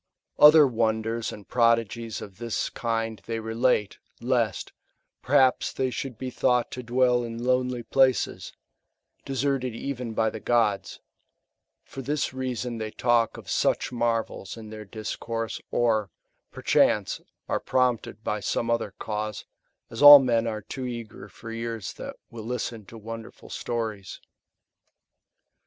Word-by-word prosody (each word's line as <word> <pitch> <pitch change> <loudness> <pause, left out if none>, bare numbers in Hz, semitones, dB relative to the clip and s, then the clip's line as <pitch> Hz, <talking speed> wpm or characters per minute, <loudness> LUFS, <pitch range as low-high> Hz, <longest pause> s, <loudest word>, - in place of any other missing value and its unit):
Other 150 0 +9
wonders 115 -1 -1
and 105 - -11
prodigies 115 -1 +1
of 100 -1 -12
this 115 -2 -2
kind 115 -2 -2
they 115 0 -2
relate, 110 -1 0 0.2
lest, 120 -5 -1 0.5
perhaps, 130 -1 +3
they 130 -1 -1
should 125 -2 -5
be 130 +1 -5
thought 125 -1 +1
to 125 - -5
dwell 125 0 +2
in 115 0 -6
lonely 125 -1 0
places, 130 +1 +1 0.7
deserted 135 -2 -1
even 125 -2 -4
by 110 -1 +2
the 110 - -7
gods; 110 -4 0 0.8
for 135 - -8
this 145 +1 -2
reason 125 -2 -3
they 110 0 -3
talk 120 0 +1
of - - -11
such - - +1
marvels 115 -4 -2
in 110 -1 -10
their 110 -1 -8
discourse, 115 +2 -4
or, 110 -4 +1 0.4
perchance, - - +2 0.3
are - - 0
prompted 125 -4 0
by 105 - -1
some 115 +3 -1
other 110 -3 -1
cause, 105 -1 -4 0.5
as 115 - -6
all 145 0 +13
men 120 -4 +1
are 110 -2 -4
too 130 +4 -5
eager 115 -4 -7
for 115 +3 -10
ears 115 -2 -4
Ma/ - - -6 0.2
will 115 -2 -8
listen 115 -3 -4
to 115 - -11
wonderful 115 +1 -9
stories? 110 -4 -4
115 Hz, 135 wpm, -26 LUFS, 110-125 Hz, 0.8 s, all